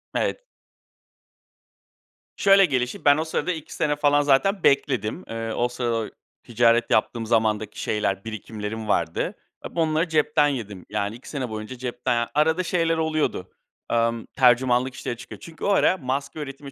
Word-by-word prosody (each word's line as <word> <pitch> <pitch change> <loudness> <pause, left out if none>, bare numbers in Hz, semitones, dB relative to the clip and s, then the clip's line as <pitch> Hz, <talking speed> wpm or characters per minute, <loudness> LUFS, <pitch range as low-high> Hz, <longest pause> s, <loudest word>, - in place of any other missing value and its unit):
Evet. - - -1 2.0
Şöyle 195 -1 +6
gelişti, 125 -5 -2
ben 145 +1 +6
o 160 - 0
sırada 165 +3 -1
2 160 -4 -7
sene 150 -2 0
falan 145 0 +3
zaten 145 +8 +2
bekledim. 140 - +1
Eee, 115 0 -4
o 120 - +1
sırada 120 -3 -2 0.3
ticaret 120 0 +2
yaptığım 110 +2 +1
zamandaki 110 -2 0
şeyler, 100 -2 -1
birikimlerim 110 0 -6
vardı. - - 0 0.3
Hep - - -9
onları 160 +1 +1
cepten 150 -1 +3
yedim. 105 -9 -5
Yani, 105 +1 -2
2 120 - -12
sene 130 -5 -4
boyunca 110 +4 -6
cepten, 120 -1 -1
arada 160 +4 +2
şeyler 165 -2 +1
oluyordu, 155 - -1 0.4
emm, 115 -1 +1
tercümanlık 125 0 +3
işleri 120 - -5
çıkıyor. - - -10
Çünkü 165 -1 -11
o - - +1
ara 190 -1 +3
maske 140 +1 -3
üretimi 140 -1 -7
125 Hz, 145 wpm, -24 LUFS, 115-155 Hz, 2.0 s, Şöyle